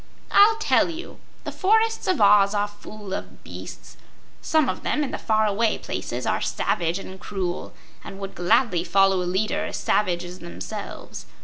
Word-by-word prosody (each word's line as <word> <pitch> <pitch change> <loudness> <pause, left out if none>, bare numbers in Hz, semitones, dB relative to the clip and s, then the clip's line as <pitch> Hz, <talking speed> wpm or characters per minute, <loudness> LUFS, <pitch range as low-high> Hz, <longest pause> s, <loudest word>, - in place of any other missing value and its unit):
"I'll 420 +2 +7
tell 445 - +3
you. 335 +2 -8 0.2
The - - -5
forests 445 +3 +2
of 370 - +1
Oz 200 0 +5
are 205 0 +1
full 205 -1 -10
of - - -7
beasts. - - -10 0.4
Some 315 -3 +2
of - - -2
them, 300 - 0
in 275 - -3
the - - -4
far 220 0 +2
away 215 +2 +1
places, - - -5
are - - 0
savage 170 +1 -1
and 190 -1 -9
cruel, 180 -2 -4 0.3
and 195 - -9
would 195 0 -6
gladly 175 0 +2
follow 195 0 +3
a 175 - -2
leader 195 +4 0
as - - -4
savage 180 -4 +1
as 180 +1 -9
themselves. 90 +2 -8
205 Hz, 175 wpm, -24 LUFS, 185-250 Hz, 0.4 s, I'll